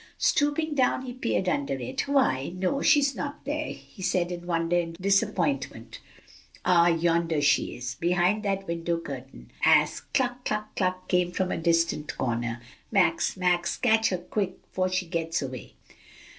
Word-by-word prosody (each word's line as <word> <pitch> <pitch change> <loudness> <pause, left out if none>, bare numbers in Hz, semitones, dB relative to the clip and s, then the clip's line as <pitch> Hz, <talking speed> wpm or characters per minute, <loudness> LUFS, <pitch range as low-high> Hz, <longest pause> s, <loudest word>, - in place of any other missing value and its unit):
Stooping 295 +1 +1
down 260 -2 +2
he 250 -1 -6
peeped 235 -6 -1
under 140 -5 0
it. 130 - -4
"Why, 175 - +1
no, 190 +10 -1
she's 285 -3 +4
not 285 -1 -5
there!" 300 +2 -2
he 195 - -12
said 180 -1 0
in 175 0 -6
wonder 165 0 0
and 165 -1 -4
disappointment. 200 +8 0 0.7
"Ah, 170 -1 +5
yonder 165 -1 +2
she 145 0 +2
is! 125 +1 -6
behind 180 +4 +2
that 195 -2 -2
window 170 0 -1
curtain," 135 -5 -9
as - - +4 0.2
"cluck, 250 -1 0
cluck 215 -2 -3
cluck," 185 -1 -1
came 180 -1 +1
from 185 0 -1
a - - -1
distant 165 -2 0
corner. 120 -1 -2 0.3
"Max, 180 -3 +2
Max, 180 -1 +1
catch 225 -2 +3
her 185 - -1
quick, 185 +2 -3 0.2
'fore 185 0 0
she 185 0 -1
gets 165 -1 -2
away!" 130 -3 -6
180 Hz, 155 wpm, -27 LUFS, 165-215 Hz, 0.7 s, Ah